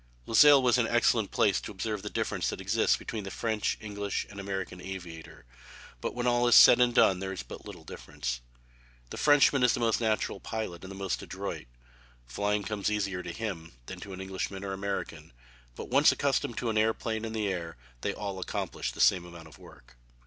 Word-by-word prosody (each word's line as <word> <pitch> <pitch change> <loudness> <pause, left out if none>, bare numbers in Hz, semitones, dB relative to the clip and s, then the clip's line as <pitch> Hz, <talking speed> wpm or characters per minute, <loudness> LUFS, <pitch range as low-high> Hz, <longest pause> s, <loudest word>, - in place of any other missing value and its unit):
Luxeuil 145 +5 +7
was 125 0 +4
an 115 - +2
excellent 115 -3 +2
place 100 - +2
to - - -7
observe 105 +1 -4
the 105 - -5
difference - - -2
that - - -5
exists - - +2
between 110 -2 -6
the 95 - -6
French, 110 0 -1
English, 100 -2 -3
and 100 - -9
American 95 -2 -5
aviator, 85 -7 -9 0.6
but - - -3
when 120 0 -2
all 120 0 +3
is 120 - +6
said 125 - +9
and 120 -1 +3
done 95 -1 +5
there 95 0 -4
is 95 - -5
but - - -10
little - - -10
difference. 65 -5 -6 0.7
The - - -6
Frenchman 145 -2 +4
is 125 -1 +4
the - - -4
most 115 -1 +1
natural 110 -2 0
pilot 110 -6 -5
and 95 - -8
the 100 - -8
most 95 -1 -3
adroit. - - -6 0.6
Flying 100 +11 -1
comes 105 -1 -2
easier 100 -3 -2
to 85 - -6
him 85 - -5
than - - -8
to 100 - -9
an 95 0 -7
Englishman 95 +1 -4
or 95 -1 -4
American, 100 -8 -5 0.4
but - - -8
once 140 +4 +5
accustomed 135 -4 -1
to 115 - -1
an 110 - +1
airplane 110 0 0
and 110 0 -4
the 105 -2 -1
air 85 -5 -4 0.2
they - - -1
all 100 -2 -5
accomplish 90 - -3
the - - -13
same 90 -2 +4
amount 85 -2 -12
of 75 - -17
work. - - -17
100 Hz, 205 wpm, -29 LUFS, 95-115 Hz, 0.7 s, said